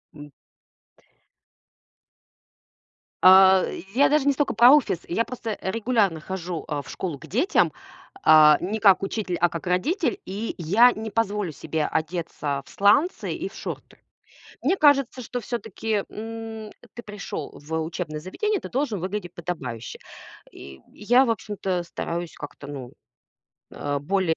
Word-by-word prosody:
М. 145 -1 -11 2.9
А, 190 0 +8 0.3
я 280 - +5
даже 295 -2 +2
не 285 - +4
столько 290 +1 0
про 240 +4 +7
офис. 280 - +3
Я 225 +7 0
просто, 230 -4 -5
регулярно 205 -4 0
хожу, 175 0 -5
э, 145 -2 -3
в - - -13
школу 170 -7 -4
к - - -13
детям, 265 - +2 0.5
э, 155 -1 +8
не 210 +5 -2
как 195 -2 +5
учитель, 195 -3 -2
а 175 0 +3
как 165 +2 -7
родитель. 300 - 0
И 205 +4 -4
я 210 +9 +5
не 220 0 -6
позволю 205 -5 -1
себе 155 +1 -3
одеться 155 -3 -3
в - - -17
сланцы 210 - +2
и - - -4
в - - -17
шорты. - - -7 0.7
Мне 355 +8 +2
кажется, 275 -5 +3
что 245 +2 -5
всё-таки, 225 -3 -3
м, 225 0 -7 0.2
ты 235 - -8
пришел 205 -8 -6
в 150 +2 -12
учебное 160 -2 -5
заведение, 405 - -2
ты - - -8
должен 255 -6 -1
выглядеть 185 -1 -5
подобающе. 135 - -6 0.5
И 65 -1 -12
я, 245 +5 +3
в 235 - 0
общем-то, 195 -5 -2
стараюсь 170 0 -5
как-то, 145 -1 -10
ну, 135 -4 -8 0.8
э, 145 0 -3
более, 170 +2 0
195 Hz, 145 wpm, -24 LUFS, 165-230 Hz, 2.9 s, А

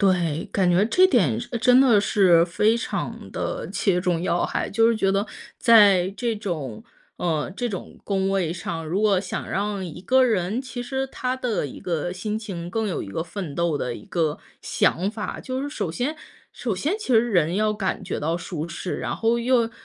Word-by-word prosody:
对， 175 -6 +2
感 190 -3 +2
觉 175 +3 +4
这 365 +11 +5
点 180 - +2 0.2
真 250 0 +6
的 240 -6 +5
是 185 -5 +4
非 210 +6 +2
常 235 - -4
地 - - -4
切 180 -3 +1
中 175 -2 0
要 175 0 0
害， - - -2
就 225 +2 +3
是 230 - +2
觉 195 -2 +2
得 195 +1 +1 0.3
在 200 -6 +6
这 235 -2 -1
种 160 - -5 0.3
呃， 160 -4 -1
这 245 - -1
种 195 -5 -7
工 195 -1 0
位 190 -4 0
上， 165 -2 -5
如 170 +6 -1
果 205 -3 +3
想 190 - -5
让 200 -1 -2
一 160 - -8
个 260 +7 +4
人 215 -1 0
其 255 -2 -6
实 265 +2 -2
他 255 -1 -3
的 235 - -1
一 - - -10
个 175 -2 -2
心 210 +3 -3
情 190 -6 -6
更 220 +3 -1
有 185 - -2
一 - - -10
个 100 +11 -3
奋 170 -2 -6
斗 170 -2 0
的 125 -3 -3
一 105 - -10
个 160 -4 -1 0.2
想 180 +4 +1
法。 215 0 -5
就 260 +1 -4
是 290 - -4
首 - - -3
先 275 +5 -2 0.4
首 230 -5 -3
先 300 - -1
其 425 - -7
实 235 +2 +4
人 175 -4 +2
要 215 +2 +2
感 205 -3 -2
觉 - - -4
到 160 +3 -1
舒 170 -2 -5
适， 170 +1 -4
然 - - -3
后 230 +1 +1
又 235 -1 +2
195 Hz, 220 characters per minute, -24 LUFS, 175-230 Hz, 0.4 s, 真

